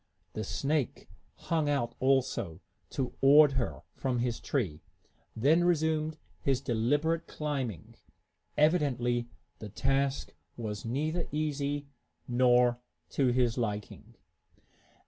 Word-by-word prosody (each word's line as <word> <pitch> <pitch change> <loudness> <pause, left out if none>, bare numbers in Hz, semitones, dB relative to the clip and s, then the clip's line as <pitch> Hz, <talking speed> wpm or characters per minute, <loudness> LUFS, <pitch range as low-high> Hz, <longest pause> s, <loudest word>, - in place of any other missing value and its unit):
The 110 - -3
snake 140 +5 -1 0.3
hung 160 -3 -1
out, 120 -5 0
also, 130 -10 +1 0.3
toward 140 +3 +5
her, 115 - -2
from 130 -2 -1
his 120 -1 -1
tree, 95 - -2 0.5
then 150 +9 +4
resumed 160 -2 +1 0.2
his 130 +7 +1
deliberate 145 +6 0
climbing. 130 - -4 0.6
Evidently 125 -7 +2 0.3
the 110 - -7
task 135 +5 0 0.2
was 105 -3 -5
neither 155 +8 -1
easy 145 -1 -1 0.4
nor 125 0 +4 0.3
to 135 - +1
his 125 -1 +2
liking. 105 -3 -4
135 Hz, 100 wpm, -30 LUFS, 120-150 Hz, 0.6 s, toward